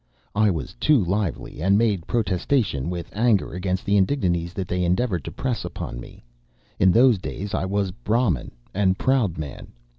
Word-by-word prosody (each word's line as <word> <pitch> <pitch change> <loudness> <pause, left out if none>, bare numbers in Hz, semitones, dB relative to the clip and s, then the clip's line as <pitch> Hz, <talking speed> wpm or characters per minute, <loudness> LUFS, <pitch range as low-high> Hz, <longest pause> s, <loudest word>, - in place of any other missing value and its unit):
I 110 0 +3
was 85 -5 -3
too 150 - +4
lively, 95 -4 -2
and 95 +3 +4
made 105 -7 +1
protestation 100 - 0
with 85 -1 -5
anger 110 -5 +2
against 90 +1 -2
the 100 +1 +3
indignities 90 -6 +1
that 95 -2 -3
they 90 0 -1
endeavored 90 - 0
to - - -5
press 125 -3 -2
upon - - -6
me. - - -12 0.6
In 95 - +5
those 120 0 +5
days 100 +2 -5
I - - 0
was 100 0 -1
Brahmin 110 - 0 0.2
and 95 -2 +2
proud 125 -10 +1
man. 75 -3 -6
95 Hz, 170 wpm, -24 LUFS, 90-110 Hz, 0.6 s, In